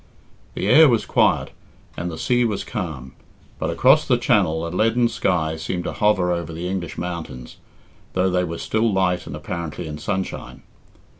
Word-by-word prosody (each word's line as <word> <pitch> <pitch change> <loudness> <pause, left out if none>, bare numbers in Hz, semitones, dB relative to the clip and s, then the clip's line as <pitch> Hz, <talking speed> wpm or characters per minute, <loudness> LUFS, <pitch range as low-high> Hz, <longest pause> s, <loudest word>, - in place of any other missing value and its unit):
The - - -2
air 160 -2 +7
was 115 -3 +1
quiet, - - +2 0.4
and 90 - -3
the 80 - -6
sea 125 +7 +2
was 105 -4 -1
calm, 80 - -5 0.5
but - - -1
across - - +5
the - - +4
Channel 80 +1 +2
a - - -3
leaden 115 +6 +2
sky 80 -6 0
seemed 90 +2 -3
to - - -4
hover 95 -4 +2
over 85 -2 -2
the 85 +2 -5
English 90 -4 -4
mountains, 80 -9 -6 0.6
though 95 0 +1
they 90 0 +1
were 85 -1 -4
still 110 +1 0
light 95 -2 0
and - - -6
apparently 85 0 -5
in 75 -1 -6
sunshine. 95 -2 -4
90 Hz, 170 wpm, -22 LUFS, 80-100 Hz, 0.6 s, air